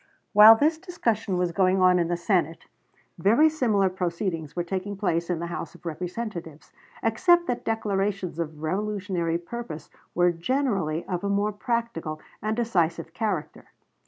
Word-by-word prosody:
While 215 +2 +10
this 310 +7 +1
discussion 230 - -1
was 180 -1 0
going 190 +1 +2
on 180 -1 +5
in 170 - +1
the 175 0 -1
Senate, 170 -3 0 0.5
very 225 - +5
similar 225 -11 +2
proceedings 175 -3 -3
were 175 - -1
taking 190 +3 -4
place 170 -4 -1
in 175 - 0
the 170 - -4
House 170 -2 -6
of - - -18
Representatives, 170 -1 -6 0.3
except 345 +10 +3
that 245 -5 -3
declarations 200 -5 -1
of 155 -2 -5
revolutionary 185 -2 -1
purpose 170 -4 -8 0.2
were 175 0 +4
generally 175 - -1
of 180 -1 -3
a 200 - -1
more 200 +1 +1
practical 205 -8 -3 0.2
and 215 +1 -2
decisive 170 -8 0
character. 205 -9 -3
190 Hz, 150 wpm, -26 LUFS, 170-220 Hz, 0.5 s, While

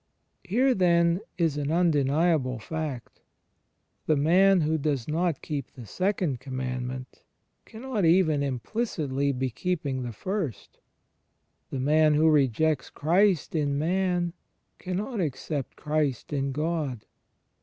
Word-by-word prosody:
Here 255 +8 +2
then 170 -2 +3 0.2
is 165 -5 +1
an 145 -1 -2
imdeniable 150 -4 +2
fact. 150 -1 -6 0.9
The 155 - +4
man 180 +6 +4
who 160 +1 +1
does 140 -5 -1
not 165 0 -1
keep 145 -4 -4
the 120 - -10
Second 180 - -1
Commandment 130 -1 -5 0.4
cannot 230 -2 -4
even 165 -3 +4
implicitly 140 - -1
be 130 -1 -2
keeping 145 -3 -2
the 120 -1 -4
First: 185 - -4 0.9
the 135 - -4
man 150 +3 +4
who 155 +2 +4
rejects 145 0 +2
Christ 175 +2 +2
in 145 -3 0
man 175 +1 0 0.5
cannot 200 +6 -3
accept 145 -2 -3
Christ 150 -3 -1
in 140 -1 -1
God. 150 -5 -2
155 Hz, 115 wpm, -27 LUFS, 135-175 Hz, 0.9 s, The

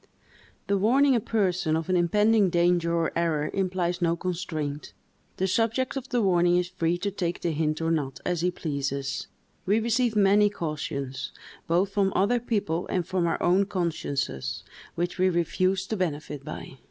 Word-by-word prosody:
The 200 -1 +1
warning 265 +7 +4
a - - +3
person 185 -7 0
of 160 0 -2
an 185 - +1
impending 210 +4 +3
danger 175 0 +2
or 165 -1 +1
error 160 -3 0
implies 180 -2 -1
no 170 -1 +2
constraint; 165 -5 -4 0.4
the 190 - +1
subject 230 +7 0
of 270 0 -5
the 245 -4 +1
warning 175 -2 +3
is 180 0 0
free 175 -2 0
to 200 +3 -2
take 175 -3 -3
the 170 - 0
hint 155 0 -1
or 165 0 +1
not, 135 -5 -1
as 175 -2 0
he 180 - +2
pleases; 140 -5 -3 0.4
we 205 +3 +3
receive 230 0 +1
many 205 0 +5
cautions, 150 -7 -4 0.4
both 180 +4 +2
from 195 -1 +2
other 230 +6 +3
people 200 -8 -1
and 180 -2 -1
from 180 -1 0
our 165 - 0
own 190 +3 +3
consciences, 140 - -2 0.3
which 175 +2 -2
we 185 0 +4
refuse 185 +2 0
to 220 - -3
benefit 150 -5 -3
by. 130 - -8
175 Hz, 170 wpm, -26 LUFS, 165-200 Hz, 0.4 s, many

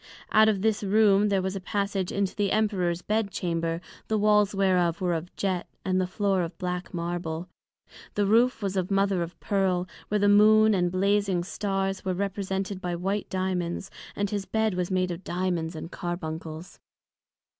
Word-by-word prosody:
Out 220 0 +6
of 200 -2 0
this 220 -1 +1
Room 205 0 +4
there 195 -2 +1
was 190 +1 -2
a - - -2
passage 200 -1 -2
into 200 -2 -1
the 205 -2 0
Emperor's 185 -5 0
Bed 215 -1 0
Chamber, 165 -3 -2 0.3
the 220 - +1
Walls 210 -1 +3
whereof 180 -4 +2
were 180 -2 0
of 170 +2 -4
Jet, 185 -3 -1 0.2
and 185 -1 +2
the 185 - -1
Floor 195 0 0
of 165 0 -4
black 180 0 -4
Marble; 170 -1 -3 0.7
the 205 - +2
Roof 230 +2 +3
was 195 -1 -1
of 185 -1 -1
Mother 195 -2 +2
of 170 +1 -5
Pearl, 185 -3 0 0.2
where 210 - +1
the 205 0 +3
Moon 215 +1 +6
and 180 -2 +1
Blazing 195 -1 +1
Stars 195 0 -2
were 185 -1 -1
represented 195 0 -3
by 175 -1 -2
white 195 +4 -2
Diamonds, 185 0 -2 0.2
and 205 -1 -1
his 200 -2 -2
Bed 220 -2 +1
was 180 -1 -2
made 185 -1 0
of 175 +2 -6
Diamonds 175 -2 -2
and 160 +2 -7
Carbuncles. 165 -2 -6
190 Hz, 175 wpm, -27 LUFS, 180-205 Hz, 0.7 s, Out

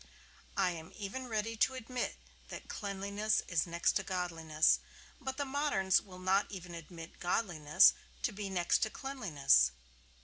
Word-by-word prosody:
I 190 -2 +3
am 160 -2 -8
even 230 +6 -5
ready 225 0 -2
to 260 +4 +2
admit 250 0 -3 0.3
that - - -8
cleanliness 200 +1 -1
is 170 -2 +1
next 170 0 +2
to 190 - -3
godliness; 165 -4 +1 0.4
but 265 0 -4
the 285 - -1
moderns 265 -9 +2
will 185 -3 -13
not 190 +2 +2
even 180 -3 -8
admit 165 0 -10
godliness 175 -5 +4 0.3
to - - +1
be 200 -1 -5
next 175 -2 +2
to 220 - +1
cleanliness. 155 - +2
190 Hz, 145 wpm, -33 LUFS, 170-220 Hz, 0.4 s, godliness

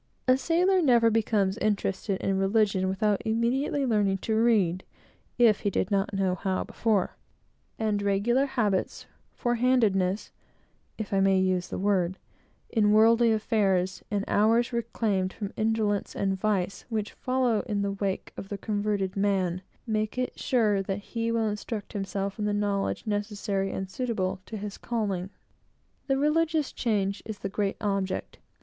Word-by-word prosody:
A 255 - +6
sailor 355 +7 +2
never 235 -6 +4
becomes 210 -2 +1
interested 200 -1 -1
in 195 -1 0
religion, 195 -1 +2
without 205 +1 +1
immediately 240 +5 0
learning 205 -5 +2
to 220 - -1
read, 210 -6 +2 0.5
if 230 -4 +5
he 205 - 0
did 190 - -1
not 195 0 +1
know 195 -2 +1
how 185 +1 -1
before; 215 -5 0 0.6
and 215 -2 0
regular 210 +7 +2
habits, 210 -8 -1 0.3
forehandedness 230 -6 +1 0.7
(if 215 -2 -5
I 195 - +3
may 195 0 +4
use 185 -1 +1
the - - -5
word) 190 -2 +1 0.5
in 210 -3 +3
worldly 230 +2 +5
affairs, 195 -4 +1
and 205 -1 -1
hours 230 +4 +3
reclaimed 215 -5 -1
from 205 -2 -6
indolence 215 -2 0
and 195 -1 0
vice, 195 -1 -1
which 215 -2 -2
follow 255 -4 +1
in 205 -3 -1
the 200 - -1
wake 195 -1 -3
of 195 - -8
the 200 - -4
converted 205 -2 -1
man, 190 -3 0 0.2
make 215 0 -1
it 255 0 -2
sure 215 -6 +2
that 195 +1 -5
he 230 0 0
will 225 -1 +1
instruct 210 0 -5
himself 195 0 -3
in 210 - -1
the 210 - 0
knowledge 205 0 -1
necessary 205 -2 -2
and 190 - -4
suitable 190 -5 -2
to 220 - -6
his 205 0 -6
calling. 200 -6 -2 0.8
The 270 -1 +2
religious 310 +1 +1
change 200 -4 -1
is 220 -2 -6
the 195 - -4
great 195 0 -1
object. 195 -3 -2
210 Hz, 150 wpm, -27 LUFS, 195-230 Hz, 0.8 s, A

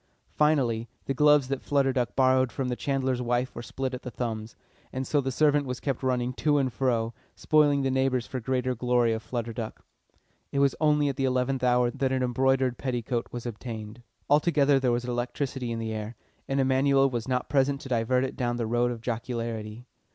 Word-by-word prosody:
Finally, 125 -7 +2 0.2
the 135 - -1
gloves 150 -1 +4
that 135 0 -2
Flutter 140 -2 +1
Duck 125 -2 -1
borrowed 130 -1 +3
from 130 +3 -3
the 125 - -1
chandler's 130 -2 -1
wife 125 +1 0
were - - -6
split 130 +2 -4
at 125 - -5
the 125 - -6
thumbs. 115 -2 -4 0.4
And 130 +1 -3
so 145 +2 +1
the 135 0 -2
servant 145 +1 +2
was 125 0 -4
kept 135 -4 -2
running 125 -1 0
to 150 -1 +3
and 130 -3 0
fro, 120 -3 0 0.2
spoiling 145 -2 +3
the 135 - +1
neighbours 130 -2 +1
for 130 - -5
the 115 - -15
greater 130 -1 0
glory 120 -1 +2
of 110 - -3
Flutter 115 -1 -4
Duck. 110 -1 -6 0.7
It - - -3
was 140 -1 +4
only 150 -1 +3
at 140 - -2
the 135 - +1
eleventh 130 0 0
hour 125 -1 +3
that 135 -1 -1
an 130 -1 +1
embroidered 130 0 +1
petticoat 120 -2 -2
was 120 0 -6
obtained. 110 -1 -7 0.3
Altogether 145 -2 +4
there 130 -2 +1
was 120 0 -1
electricity 125 +1 -3
in 115 - -2
the 110 -1 -3
air, 110 +2 -5 0.3
and 135 0 0
Emanuel 135 +1 +3
was 120 -3 -3
not 125 -1 -1
present 140 0 +2
to 135 - -9
divert 125 +1 +1
it 135 - -3
down 120 -1 -1
the 115 - -1
road 120 +2 +1
of 120 -2 -5
jocularity. 115 -1 -4
125 Hz, 205 wpm, -27 LUFS, 120-135 Hz, 0.7 s, gloves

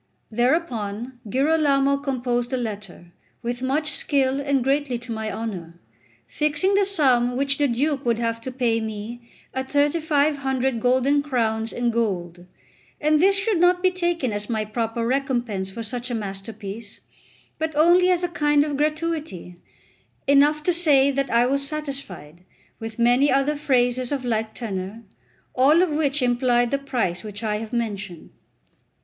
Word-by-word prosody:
Thereupon 240 -2 -1
Girolamo 280 +1 +2
composed 250 -3 -2
a - - +1
letter, 205 -7 -6 0.3
with 240 +1 -3
much 300 +4 0
skill 275 -2 0
and 275 -2 +1
greatly 275 -1 0
to 240 0 -9
my 220 -1 -3
honour, 175 -7 -6 0.5
fixing 300 - 0
the 400 0 +3
sum 255 -10 +2
which 275 +1 +1
the 290 - +3
Duke 275 +3 0
would 235 -2 +1
have 230 -1 -2
to 260 - -5
pay 240 -3 0
me 220 +2 -7 0.2
at 265 0 -4
3500 285 -4 +1
golden 260 +4 +2
crowns 225 -5 -1
in 240 -1 0
gold; 180 -6 -2 0.5
and 305 0 +3
this 390 +2 +4
should 395 -2 +1
not 355 +1 +3
be 370 - +4
taken 345 - -1
as 205 +1 -4
my 220 -2 -1
proper 225 +1 -2
recompense 240 -7 -1
for 230 +4 -6
such 245 +2 -4
a 245 - -2
masterpiece, 205 +1 -7 0.6
but 315 -1 -2
only 350 +4 +5
as 360 -1 +2
a - - +2
kind 295 -4 +2
of 295 -2 -3
gratuity; 305 - -2 0.7
enough 290 +2 +4
to 360 - +2
say 290 -5 +4
that 275 -1 -1
I 235 +1 +3
was 275 +2 +1
satisfied; 270 - -6 0.4
with 225 -1 -7
many 245 +4 +4
other 275 +3 +2
phrases 255 -3 +1
of 270 -3 -2
like 220 -2 -1
tenor, 205 0 -5 0.5
all 295 +7 +5
of 360 - 0
which 295 -2 0
implied 245 -1 +2
the 280 - +1
price 230 -11 -2
which 210 0 -7
I 210 -1 0
have 220 +1 -7
mentioned. 210 -7 -4
255 Hz, 155 wpm, -23 LUFS, 225-290 Hz, 0.7 s, only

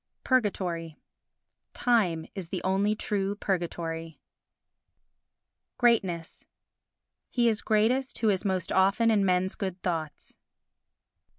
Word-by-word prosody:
Purgatory 180 - 0 0.8
Time 185 -10 +2
is 185 -4 -7
the 185 - -4
only 195 +3 +1
true 200 -1 -2
purgatory. 165 -4 -3 1.6
Greatness 190 -9 +1 0.9
He 240 -1 +2
is 220 -1 +1
greatest 240 +5 +1
who 220 - +2
is 190 -3 +1
most 185 -3 -1
often 200 +5 +3
in 205 -2 +3
men's 185 0 +1
good 190 -3 -4
thoughts. 160 -4 -4
190 Hz, 100 wpm, -28 LUFS, 170-215 Hz, 1.6 s, often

